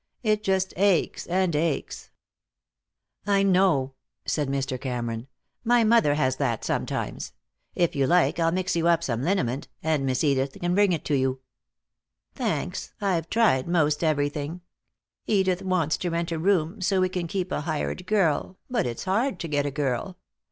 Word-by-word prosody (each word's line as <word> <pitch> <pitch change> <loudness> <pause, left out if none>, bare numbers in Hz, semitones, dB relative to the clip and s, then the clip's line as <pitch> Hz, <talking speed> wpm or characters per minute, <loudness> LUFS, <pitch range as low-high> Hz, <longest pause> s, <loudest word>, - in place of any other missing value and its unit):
It 215 -2 +2
just 190 -1 0
aches 195 -3 +1
and 180 -2 +1
aches." 155 -1 -2 1.2
"I 200 -1 +3
know," 180 -9 +3 0.3
said 150 -3 0
Mr. 135 -2 -2
Cameron. 120 -2 -3 0.4
"My 240 0 +4
mother 220 -10 +4
has 130 -3 +1
that, 120 -6 -1
sometimes. - - -3 0.4
If 175 -3 +1
you 135 -2 +2
like 175 +1 +3
I'll 165 0 +2
mix 185 0 -1
you 170 0 +1
up 170 -1 +3
some 115 -5 -2
liniment, 135 -6 -1 0.2
and 155 -3 +1
Miss 130 +1 0
Edith 135 -2 +1
can 175 0 0
bring 200 0 +4
it 165 -4 -2
to 150 - +1
you." 130 -1 0 0.9
"Thanks. - - -3
I've 175 -5 -1
tried 205 - +3
most 155 -3 +1
everything. 150 +2 -1 0.7
Edith 190 -3 +2
wants 180 -5 0
to 180 - -2
rent 170 0 -2
a 165 - -2
room, 185 +1 +1
so 185 +1 +2
we 185 - +3
can 180 -2 -3
keep 185 +1 -3
a - - -1
hired 160 +3 -3
girl, 185 -3 +1
but 235 - +1
it's 120 - -5
hard 200 +2 0
to 170 - -3
get 145 -2 0
a - - 0
girl. 140 +6 -2
170 Hz, 165 wpm, -25 LUFS, 145-190 Hz, 1.2 s, My